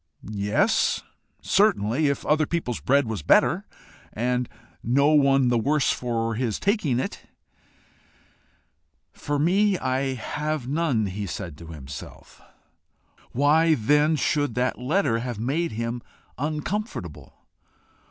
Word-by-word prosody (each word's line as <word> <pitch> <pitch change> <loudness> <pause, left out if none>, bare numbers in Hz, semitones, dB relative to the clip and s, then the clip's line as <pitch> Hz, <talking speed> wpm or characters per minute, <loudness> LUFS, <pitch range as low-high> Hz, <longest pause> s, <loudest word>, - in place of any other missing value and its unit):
Yes, 110 - +1 0.4
certainly 155 - +2
if 140 - -1
other 155 0 +2
people's 160 -9 -2
bread 140 +1 +2
was 110 -6 -4
better, - - +3 0.4
and 125 +2 -1 0.3
no 140 +5 +3
one 135 -4 +4
the 120 -1 +2
worse 140 +3 +2
for 115 -2 -2
his 115 -2 -2
taking 190 - +1
it. - - -5 1.9
"For 145 0 -3
me, 190 +6 +3
I 130 -1 -1
have 150 +2 -3
none," 140 -6 +1
he 100 +1 -4
said 85 -4 -6
to 85 - -11
himself. 70 -3 -10 0.9
Why 155 +5 +4
then 150 +6 +3
should 145 -4 0
that 125 0 0
letter 125 -3 +1
have 120 -2 -4
made 140 +9 -1
him 115 +2 -3 0.3
uncomfortable? 150 - -4
130 Hz, 115 wpm, -25 LUFS, 115-155 Hz, 1.9 s, one